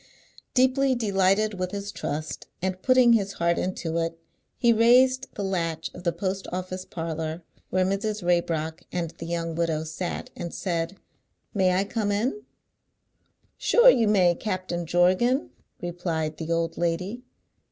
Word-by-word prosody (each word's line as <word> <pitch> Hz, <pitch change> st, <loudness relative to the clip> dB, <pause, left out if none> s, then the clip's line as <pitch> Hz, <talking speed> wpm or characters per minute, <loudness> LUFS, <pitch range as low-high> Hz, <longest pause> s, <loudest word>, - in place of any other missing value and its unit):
Deeply 260 Hz, +1 st, +3 dB
delighted 200 Hz, -2 st, +2 dB
with 185 Hz, 0 st, -1 dB
his 200 Hz, +1 st, -5 dB
trust, 155 Hz, -4 st, -4 dB
and 185 Hz, 0 st, -2 dB
putting 255 Hz, -2 st, +5 dB
his 200 Hz, -3 st, +1 dB
heart 170 Hz, 0 st, +1 dB
into 170 Hz, -3 st, -2 dB
it, 165 Hz, 0 st, -2 dB, 0.4 s
he 235 Hz, -1 st, +4 dB
raised 255 Hz, +3 st, +5 dB
the 205 Hz, -, -3 dB
latch 170 Hz, -4 st, -2 dB
of 180 Hz, -, -10 dB
the 170 Hz, -, +2 dB
post 190 Hz, +1 st, -3 dB
office 185 Hz, 0 st, -4 dB
parlour 165 Hz, 0 st, -4 dB, 0.3 s
where 185 Hz, 0 st, +2 dB
Mrs. 205 Hz, +2 st, -1 dB
Raybrock 165 Hz, -2 st, 0 dB
and 170 Hz, -2 st, -2 dB
the 165 Hz, -, -6 dB
young 165 Hz, -1 st, -2 dB
widow 160 Hz, -1 st, 0 dB
sat, 160 Hz, +3 st, -5 dB
and 170 Hz, -1 st, -5 dB
said, 170 Hz, 0 st, -2 dB, 0.6 s
"May 185 Hz, -3 st, +3 dB
I 190 Hz, -, +2 dB
come 205 Hz, 0 st, -1 dB
in?" 245 Hz, -, -1 dB, 1.2 s
"Sure -, -, +7 dB
you 230 Hz, -3 st, +2 dB
may, 185 Hz, -4 st, +4 dB
Captain 180 Hz, -3 st, -3 dB
Jorgan!" 185 Hz, -, +2 dB, 0.3 s
replied 170 Hz, -3 st, -3 dB
the 165 Hz, 0 st, -4 dB
old 165 Hz, 0 st, -1 dB
lady. 180 Hz, +7 st, -1 dB
185 Hz, 145 wpm, -26 LUFS, 170-210 Hz, 1.2 s, Sure